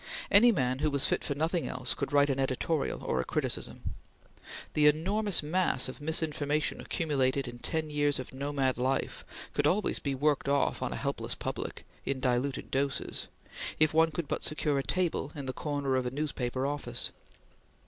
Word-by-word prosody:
Any 230 +4 +8
man 130 - 0
who 155 +1 +2
was 140 -1 +3
fit - - +1
for 140 - -2
nothing 165 +3 0
else 130 0 +1
could 140 +1 -3
write 145 0 +4
an 135 - -1
editorial 135 +4 -1
or 65 - 0
a - - -3
criticism. - - -3 0.8
The 150 0 +5
enormous 190 +5 +3
mass 165 -4 +2
of 130 +3 -8
misinformation 155 -1 0
accumulated 135 -4 0
in 120 0 -8
ten 155 +3 -2
years 145 -1 +2
of 130 - -7
nomad 135 -1 0
life 130 +2 -1 0.3
could 145 - +2
always 195 +7 +2
be 140 -2 -2
worked 145 0 +1
off 140 0 +1
on - - -1
a - - -3
helpless - - -2
public, - - -5 0.2
in 135 -1 -2
diluted 130 +1 0
doses, 135 0 -1 0.5
if 155 0 +5
one 160 +1 +5
could 160 0 -4
but - - -2
secure 150 -2 +1
a - - -1
table 175 -5 0
in 140 -2 -5
the 130 - -3
corner 145 -2 -1
of 130 -1 0
a - - +1
newspaper 130 -2 -2
office. 145 0 -2
145 Hz, 180 wpm, -30 LUFS, 135-155 Hz, 0.8 s, Any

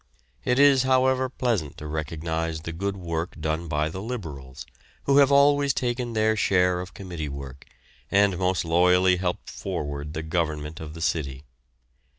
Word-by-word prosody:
It 125 - +1
is, 140 -2 +6
however, 130 0 +2
pleasant 115 - -2
to 75 - -8
recognise 80 +1 -3
the 85 - -5
good 100 +4 -3
work 85 -2 -4
done 80 +2 -2
by 75 0 0
the 95 +4 -6
Liberals, 80 - -7 0.4
who 140 0 +3
have 140 -1 +6
always 140 -1 +4
taken 120 -1 -2
their 110 0 +2
share 90 -3 +2
of 90 - -9
committee 85 -6 -5
work 70 -1 -8 0.4
and 100 -2 +3
most 90 -1 +1
loyally 90 +2 +4
helped 90 -1 -3
forward 75 +1 -5
the 80 - -3
government 80 -2 -2
of 80 0 -8
the 80 - -8
city. 70 -5 -2
90 Hz, 160 wpm, -25 LUFS, 80-110 Hz, 0.4 s, is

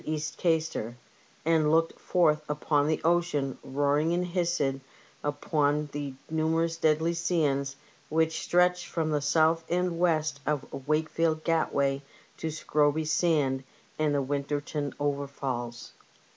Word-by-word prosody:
East 155 0 -3
Gaistor, 160 -9 0 0.5
and 160 -2 +3
looked 165 +1 +2
forth 155 -4 +2
upon 150 0 +1
the 155 - +1
ocean 165 -5 +1
roaring 145 +4 +1
and 180 +1 0
hissing 170 -6 0 0.4
upon 145 0 0
the 145 -2 -5
numerous 160 +1 0
deadly 160 +1 +2
sands 145 -5 0 0.3
which 160 +1 +1
stretch 180 0 +2
from 160 -2 -1
the 150 -1 +1
south 160 +3 +3
and 175 -1 0
west 155 -5 +1
of 145 -2 -1 0.2
Wakefield 155 +1 +1
Gatway 140 -4 +1 0.4
to 160 - -4
Scroby 155 0 +1
Sand 150 -4 +1 0.4
and 150 -1 +2
the 140 - +1
Winterton 145 +1 -2
Overfalls. 140 -4 -3
155 Hz, 120 wpm, -28 LUFS, 145-165 Hz, 0.5 s, and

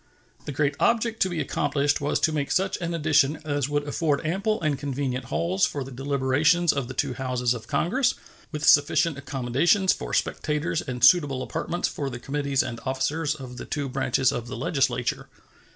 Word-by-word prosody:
The - - -4
great 140 +1 0
object 230 -1 +1
to 190 - +3
be 175 -3 -3
accomplished 145 0 0
was 145 - 0
to 160 - +3
make 145 -2 -2
such 190 0 +1
an 170 0 -2
addition 150 -2 +3
as 145 -2 -1
would 145 0 0
afford 150 0 0
ample 200 +7 0
and 155 -3 0
convenient 135 -3 -3
halls 175 +8 -1
for 140 - -4
the 135 - -10
deliberations 140 +5 +2
of 140 -3 -2
the 130 - -8
two 140 -1 -1
Houses 125 -2 -1
of 115 -3 -8
Congress, 245 - +1 0.4
with 150 -2 -3
sufficient 150 +2 +4
accommodations 140 - +2
for - - -7
spectators 150 +2 -1
and 125 -3 -6
suitable 145 -7 +4
apartments 175 +6 -2
for 140 -2 -4
the 120 - -6
committees 140 +1 -1
and 115 -2 -5
officers 145 +4 -1
of 130 -4 -9
the - - -7
two 145 -2 -3
branches 135 0 +1
of 120 -3 -4
the 125 - -6
Legislature. 135 -7 -1
145 Hz, 185 wpm, -25 LUFS, 130-160 Hz, 0.4 s, sufficient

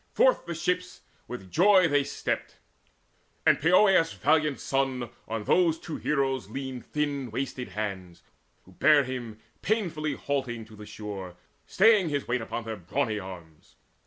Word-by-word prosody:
Forth - - +3
the 170 - -3
ship 180 +3 0 0.5
With 95 -7 -8
joy 185 0 +5
they 145 -2 +2
stepped; - - -4 0.9
and - - +4
Poeas' 180 0 +5
valiant 150 -3 +2
son 135 -3 -1 0.2
On 110 -1 -3
those 165 +6 +3
two 160 - -6
heroes 135 -7 -1
leaned 130 0 -6
thin 145 -4 -2
wasted 125 +1 -4
hands, 95 -5 -5 0.4
Who 95 - -19
bare 145 +9 +5
him 120 -4 -6 0.2
painfully 165 -9 -1
halting 130 -6 -3
to 110 0 -15
the 105 0 -11
shore 100 -4 -7 0.3
Staying 205 -3 +4
his 145 -2 -2
weight 120 0 0
upon 115 +1 -4
their 110 -1 -5
brawny 105 +4 -1
arms. 85 -5 -11
135 Hz, 145 wpm, -27 LUFS, 110-155 Hz, 0.9 s, joy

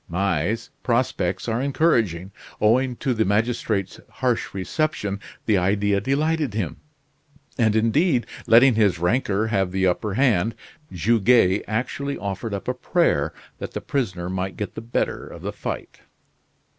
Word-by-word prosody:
"May's 95 +4 -1
prospects 115 -7 0
are 115 +1 0
encouraging." 115 - +1 0.3
Owing 125 +4 +3
to 130 +1 -1
the 110 -2 +1
magistrate's 105 -2 0
harsh 125 -3 -1
reception 100 - -2 0.3
the 105 -4 +3
idea 100 +2 +1
delighted 145 0 0
him; 95 -8 -2 0.8
and, 110 -4 +2
indeed, 120 +5 +2 0.2
letting 120 +3 +7
his 105 -5 +3
rancor 105 +3 +1
have 95 -4 +1
the 95 0 +1
upper 95 +2 0
hand, 115 -5 +2 0.4
Goguet 105 +1 +3
actually 130 +6 -2
offered 100 +2 -4
up 100 - -7
a 125 - +1
prayer 125 - +1 0.3
that - - -6
the - - -2
prisoner 95 -11 -2
might 95 +1 -3
get 105 - -4
the - - -6
better 115 +1 -2
of - - -11
the - - -3
fight. - - -6
110 Hz, 140 wpm, -23 LUFS, 95-125 Hz, 0.8 s, letting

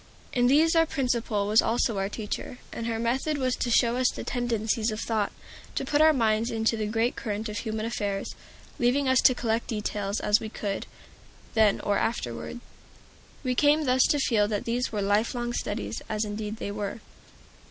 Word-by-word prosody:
In 245 -1 +3
these 315 +5 +4
our 325 0 +4
Principal 240 -8 0
was 215 +2 +5
also 225 -2 +1
our 195 0 -1
teacher, 215 +3 -5 0.2
and 230 - -4
her 230 -1 -1
method 260 +6 0
was 255 -2 0
to 245 - -1
show 235 +1 +3
us 255 -1 +3
the - - -6
tendencies 230 -2 0
of 215 0 -3
thought, 220 -3 -1 0.4
to - - -1
put 295 0 +2
our 315 0 +7
minds 225 -4 +1
into 225 0 +1
the 215 -1 -2
great 225 +3 0
current 215 +1 -3
of 210 -1 -4
human 220 -1 -3
affairs, 205 -4 -3 0.5
leaving 260 +3 +2
us 260 -1 +4
to 255 - +5
collect 230 -1 -1
details 210 -2 -2
as 210 +1 +3
we 220 - -6
could, 200 -2 -4 0.7
then 220 -3 +4
or 205 - +1
afterward. 225 - -3 0.8
We 255 -2 0
came 295 +4 +3
thus 255 0 +3
to 295 - +3
feel 225 -7 +2
that 205 -1 -2
these 240 +2 -1
were 210 -2 -1
life 205 +5 +1
long 240 0 -2
studies, 210 -1 -3
as 215 0 -1
indeed 210 0 -4
they 200 - -4
are. 205 +2 -4
225 Hz, 190 wpm, -27 LUFS, 210-250 Hz, 0.8 s, our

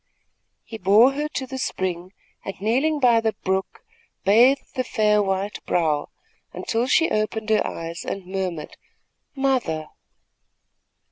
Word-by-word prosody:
He 225 - -9
bore 215 +7 +6
her 295 +2 -2
to 265 - -2
the 260 0 -6
spring 185 -6 -3 0.3
and, 195 - -7
kneeling 265 +9 +1
by 240 -4 +4
the 220 -1 0
brook, 190 - -2 0.4
bathed 240 +7 +4
the 255 - -1
fair 210 -3 +2
white 195 +1 -2
brow, 155 -4 0 0.4
until 230 +2 -1
she 325 +5 +3
opened 215 +1 -1
her 215 - +4
eyes 165 +1 -6
and 195 -2 -5
murmured: 180 -4 -4 0.6
"Mother!" 250 - 0
215 Hz, 130 wpm, -23 LUFS, 185-255 Hz, 0.6 s, bore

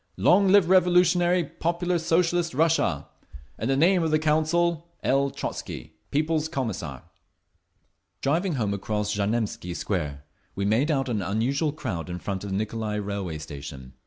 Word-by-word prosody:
Long 195 +2 +4
live 195 -2 +5
revolutionary, 180 -1 +4
popular, 175 +3 -1
Socialist 170 -1 +1
Russia! 150 - +1 0.5
In 110 - -2
the 135 0 +2
name 175 +5 +4
of 165 - +1
the 155 - +3
Council, 160 +2 +1 0.2
L. 140 +1 +2
TROTZKY, 80 - -6 0.2
People's 155 +1 0
Commissar…. 95 - -4 1.2
Driving 170 +6 +1
home 105 -6 0
across 105 +1 -2
Znamensky 100 -4 -2
Square, 75 -9 -3 0.3
we 100 - -1
made 115 +9 +2
out 135 -3 +1
an 110 -5 -1
unusual 120 - 0
crowd 90 - -5
in 90 - -4
front 95 +1 -4
of 100 - -5
the 95 - -2
Nicolai 110 +1 -2
Railway 100 -5 -3
Station. 70 -4 -9
135 Hz, 145 wpm, -26 LUFS, 100-165 Hz, 1.2 s, live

